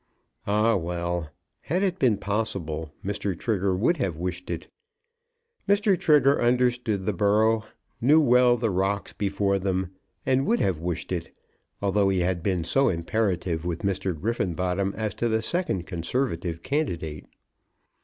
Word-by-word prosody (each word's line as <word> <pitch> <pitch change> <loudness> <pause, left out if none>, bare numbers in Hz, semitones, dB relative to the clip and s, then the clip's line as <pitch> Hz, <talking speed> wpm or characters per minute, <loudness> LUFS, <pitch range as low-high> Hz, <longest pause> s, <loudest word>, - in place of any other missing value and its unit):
Ah, 105 +3 +3
well! 85 -2 -2 0.3
had 180 +6 -1
it 190 -2 0
been 120 -6 +3
possible, 95 -7 -3
Mr. 100 -2 -2
Trigger 100 -3 0
would 120 - +2
have 95 - -1
wished 90 +1 -4
it. 85 -1 -4 1.0
Mr. 200 0 +4
Trigger 145 -4 +4
understood 120 -4 +1
the 105 - 0
borough, 110 +3 +2 0.4
knew 145 +7 +6
well 125 -3 +5
the 115 -2 0
rocks 95 +1 -1
before 100 -1 0
them, 95 -1 -1 0.3
and 135 +1 +2
would 235 +1 +2
have 90 -5 +1
wished 85 +1 -4
it, 85 -3 -3 0.5
although 100 0 +3
he 95 -2 +1
had 90 -1 0
been 90 -2 0
so 135 +10 +2
imperative 90 -2 -1
with 85 -1 -3
Mr. 95 -4 -1
Griffenbottom 95 -1 -1
as 110 -2 -2
to 120 - -1
the 110 0 0
second 140 - -1
conservative 85 -2 -2
candidate. 85 - -2
100 Hz, 145 wpm, -26 LUFS, 90-120 Hz, 1.0 s, knew